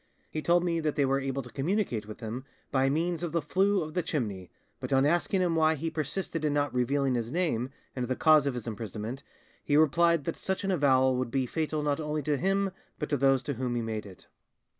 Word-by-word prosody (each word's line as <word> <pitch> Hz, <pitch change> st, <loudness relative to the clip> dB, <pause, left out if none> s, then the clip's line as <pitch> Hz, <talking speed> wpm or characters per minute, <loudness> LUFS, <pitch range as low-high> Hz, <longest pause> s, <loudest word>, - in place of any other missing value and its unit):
He 155 Hz, -, -3 dB
told 175 Hz, +2 st, +3 dB
me 170 Hz, -2 st, 0 dB
that 155 Hz, -2 st, -1 dB
they 140 Hz, -, +3 dB
were 135 Hz, +1 st, +2 dB
able 135 Hz, 0 st, -2 dB
to 125 Hz, -, -12 dB
communicate 140 Hz, -, -1 dB
with 110 Hz, -, -9 dB
him 115 Hz, +3 st, -5 dB, 0.3 s
by 135 Hz, 0 st, +3 dB
means 165 Hz, +3 st, 0 dB
of 170 Hz, -3 st, -3 dB
the 170 Hz, -, +2 dB
flue 190 Hz, +4 st, +2 dB
of 155 Hz, 0 st, -7 dB
the 180 Hz, -, +1 dB
chimney, 105 Hz, -, -3 dB, 0.3 s
but -, -, -6 dB
on 135 Hz, 0 st, +4 dB
asking 175 Hz, +4 st, +2 dB
him 175 Hz, -2 st, +1 dB
why 160 Hz, 0 st, +4 dB
he 165 Hz, +2 st, -3 dB
persisted 160 Hz, +2 st, -3 dB
in 150 Hz, -1 st, +1 dB
not 145 Hz, -1 st, 0 dB
revealing 135 Hz, +2 st, +1 dB
his 120 Hz, -1 st, -2 dB
name 150 Hz, -8 st, 0 dB, 0.3 s
and 125 Hz, -2 st, -2 dB
the 130 Hz, -, 0 dB
cause 155 Hz, -1 st, +5 dB
of 135 Hz, -, -1 dB
his 120 Hz, -, -5 dB
imprisonment, 110 Hz, +3 st, -5 dB, 0.4 s
he 145 Hz, -, +2 dB
replied 170 Hz, +1 st, +4 dB
that 165 Hz, -, -3 dB
such 190 Hz, +1 st, -2 dB
an 195 Hz, -, 0 dB
avowal 130 Hz, -6 st, +3 dB
would 125 Hz, -1 st, -1 dB
be 135 Hz, +1 st, 0 dB
fatal 155 Hz, +2 st, -2 dB
not 145 Hz, 0 st, 0 dB
only 150 Hz, -1 st, -2 dB
to 150 Hz, +1 st, +1 dB
him 195 Hz, +4 st, +1 dB, 0.3 s
but 150 Hz, -, -4 dB
to 145 Hz, -, +1 dB
those 135 Hz, -1 st, +3 dB
to 145 Hz, -, -2 dB
whom 125 Hz, -1 st, -2 dB
he 120 Hz, -, 0 dB
made 110 Hz, -2 st, -4 dB
it. 95 Hz, -2 st, -14 dB
145 Hz, 235 wpm, -29 LUFS, 130-165 Hz, 0.4 s, cause